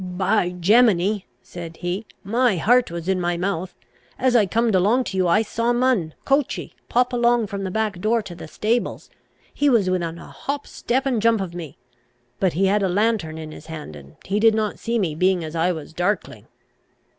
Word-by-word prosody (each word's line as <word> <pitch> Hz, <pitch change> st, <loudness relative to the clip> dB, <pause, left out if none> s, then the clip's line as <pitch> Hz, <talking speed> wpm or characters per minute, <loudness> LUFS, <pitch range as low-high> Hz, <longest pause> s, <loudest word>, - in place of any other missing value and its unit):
"By 185 Hz, +1 st, 0 dB
Gemini," 205 Hz, 0 st, +3 dB, 0.2 s
said 165 Hz, -2 st, -9 dB
he, 185 Hz, +5 st, -4 dB, 0.2 s
"my 230 Hz, 0 st, +2 dB
heart 245 Hz, +8 st, +3 dB
was 170 Hz, 0 st, -6 dB
in 190 Hz, -1 st, +1 dB
my 175 Hz, 0 st, 0 dB
mouth. 180 Hz, 0 st, -3 dB, 0.4 s
As 255 Hz, -1 st, +2 dB
I 215 Hz, -4 st, +5 dB
comed 230 Hz, +3 st, +1 dB
along 210 Hz, +8 st, +3 dB
to 190 Hz, -, -5 dB
you, 185 Hz, -1 st, +2 dB
I 210 Hz, +6 st, +4 dB
saw 230 Hz, +2 st, 0 dB
Mun, 240 Hz, -10 st, +1 dB
coachey, 275 Hz, 0 st, 0 dB, 0.2 s
pop 250 Hz, +1 st, +2 dB
along 240 Hz, -1 st, +3 dB
from 200 Hz, -1 st, -5 dB
the 190 Hz, -, -2 dB
back 210 Hz, -2 st, -2 dB
door 225 Hz, +2 st, +1 dB
to 195 Hz, -3 st, -8 dB
the 170 Hz, -, -9 dB
stables. 225 Hz, +8 st, -2 dB, 0.4 s
He 290 Hz, 0 st, +2 dB
was 210 Hz, -8 st, +3 dB
within 170 Hz, -2 st, -2 dB
a -, -, -11 dB
hop, 285 Hz, +1 st, -5 dB
step, 260 Hz, +3 st, -2 dB
and 250 Hz, -5 st, 0 dB
jump 230 Hz, 0 st, +3 dB
of 185 Hz, -3 st, -4 dB
me. 170 Hz, -5 st, -8 dB, 0.6 s
But 185 Hz, -3 st, +1 dB
he 190 Hz, +4 st, +2 dB
had 200 Hz, +2 st, +2 dB
a 190 Hz, -, +1 dB
lanthorn 200 Hz, -5 st, 0 dB
in 155 Hz, -1 st, -7 dB
his -, -, -12 dB
hand, 155 Hz, -, -8 dB
and 70 Hz, -1 st, -13 dB
he 200 Hz, +2 st, 0 dB
did 220 Hz, 0 st, +5 dB
not 215 Hz, -1 st, -1 dB
see 235 Hz, 0 st, -1 dB
me, 180 Hz, -8 st, 0 dB
being 180 Hz, +2 st, +1 dB
as 160 Hz, +1 st, -6 dB
I 165 Hz, +2 st, +2 dB
was 160 Hz, -2 st, -7 dB
darkling." 180 Hz, +5 st, -2 dB
195 Hz, 205 wpm, -22 LUFS, 175-230 Hz, 0.6 s, I